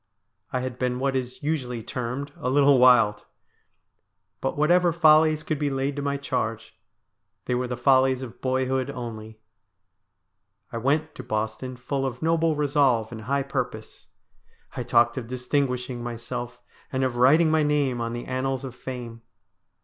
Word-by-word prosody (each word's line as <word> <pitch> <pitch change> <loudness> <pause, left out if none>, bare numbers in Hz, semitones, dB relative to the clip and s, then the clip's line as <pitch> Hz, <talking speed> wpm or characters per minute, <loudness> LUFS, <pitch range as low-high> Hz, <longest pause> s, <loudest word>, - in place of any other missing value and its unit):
I 130 - -1
had 130 -1 -5
been 125 -1 0
what 135 +1 0
is 125 0 -4
usually 125 -7 -2
termed 125 +4 -4
' - - -23
a 145 -7 -2
little 140 0 +5
wild.' 115 -5 +5 1.2
But 135 - -2
whatever 175 +3 +4
follies 155 -1 +4
could 155 -2 -2
be 145 -1 0
laid 135 +1 -1
to 145 - -3
my 140 0 -1
charge, 125 -5 -3 0.7
they - - -1
were 125 +1 -1
the 125 -1 -4
follies 130 0 +3
of 120 -2 -10
boyhood 130 0 0
only. 110 -4 -7 1.3
I 115 - -3
went 150 +5 0
to 130 - -9
Boston 110 +3 -3
full 135 +2 -3
of 130 +1 -4
noble 165 -1 +2
resolve 140 -6 +2
and 110 -2 -8
high 140 +2 0
purpose. 125 -5 -5 0.7
I - - -3
talked 120 +1 +3
of 115 - -8
distinguishing 125 -1 -2
myself, 120 +1 -6 0.3
and 130 0 0
of 130 -2 -1
writing 155 +6 +5
my 160 0 +3
name 145 -5 +1
on 115 0 -3
the 120 0 -5
annals 130 +1 -2
of 130 - -7
fame. 120 -3 -7
130 Hz, 160 wpm, -25 LUFS, 120-140 Hz, 1.3 s, little